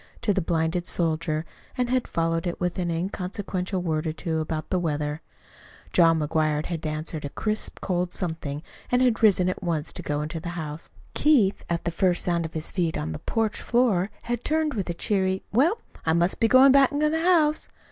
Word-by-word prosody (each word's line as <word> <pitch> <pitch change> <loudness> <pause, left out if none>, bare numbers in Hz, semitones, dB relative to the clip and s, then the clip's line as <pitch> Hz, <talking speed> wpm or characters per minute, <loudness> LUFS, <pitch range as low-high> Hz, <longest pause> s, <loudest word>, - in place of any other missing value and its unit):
to 210 - +2
the 195 - 0
blinded 165 +1 -1
soldier, 160 -1 0 0.3
and 250 -1 0
had 255 -1 +1
followed 165 +1 -1
it 175 - -3
with 180 +1 -2
an 175 -1 -1
inconsequential 185 +1 -3
word 160 -2 -1
or - - 0
two 160 0 -3
about 155 0 -4
the 185 - +2
weather. 150 -2 -2 0.7
John 165 -2 +5
McGuire 155 0 0
had 165 -2 -4
answered 155 0 -4
a 145 - -4
crisp, 215 +7 -2
cold 180 -1 -1
something, 160 -5 -1 0.3
and 250 +1 +4
had 245 -3 +2
risen 195 -5 +5
at 185 - -2
once 165 -4 -2
to - - -4
go 145 0 -2
into 160 +2 -4
the 170 +2 -6
house. 155 -1 -6 0.2
Keith, 240 -11 +3
at 170 0 -1
the 170 - 0
first 175 +1 +2
sound 170 -2 0
of 160 - -8
his 155 0 -2
feet 170 -4 -1
on 80 +1 -3
the 80 - -5
porch 225 -1 -1
floor, 225 -6 +2
had 240 0 -3
turned 310 -1 +1
with 200 -6 -3
a 175 - -2
cheery 190 0 0
"Well, 310 - +3 0.3
I 160 - +2
must 170 +2 +1
be 225 - +4
going 260 +3 +7
back 275 -1 +6
to 300 +1 +1
the 320 +1 0
house." 325 -4 +3
175 Hz, 205 wpm, -25 LUFS, 160-215 Hz, 0.7 s, going